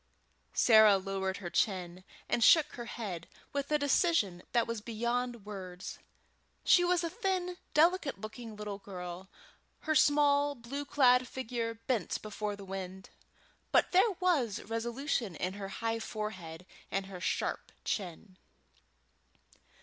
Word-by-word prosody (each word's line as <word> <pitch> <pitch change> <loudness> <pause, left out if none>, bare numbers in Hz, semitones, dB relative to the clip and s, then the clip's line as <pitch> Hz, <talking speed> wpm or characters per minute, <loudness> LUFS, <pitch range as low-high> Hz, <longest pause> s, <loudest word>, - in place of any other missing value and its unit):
Sarah 220 -3 +7
lowered 190 0 -2
her 175 -4 -6
chin, 185 -3 -1 0.2
and 235 - +1
shook 305 +2 +7
her 240 - -7
head 190 -9 -5 0.3
with 280 +1 -2
a 300 - +5
decision 285 - +2
that 235 -1 +3
was 230 -2 -4
beyond 235 0 -2
words. 185 -3 -7 0.7
She 355 - +6
was 355 0 +2
a 335 - -1
thin, 370 -4 -1 0.2
delicate 320 - +3
looking 220 +1 -8
little 210 -1 -5
girl, 180 -1 -8 0.5
her 315 - 0
small 290 0 +4
blue 270 +4 -6
clad 255 -3 +4
figure 235 -3 -3
bent 225 -3 -2
before 210 -1 -3
the 200 -1 -10
wind, 190 0 -7 0.6
but - - +4
there 380 +5 +5
was 300 - +1
resolution 230 - -2
in 185 +4 -2
her 200 -1 -6
high 225 +3 -2
forehead 185 -7 -6 0.2
and 195 0 -1
her 190 -2 -9
sharp - - -2
chin. 185 0 -4
225 Hz, 135 wpm, -32 LUFS, 195-280 Hz, 0.7 s, Sarah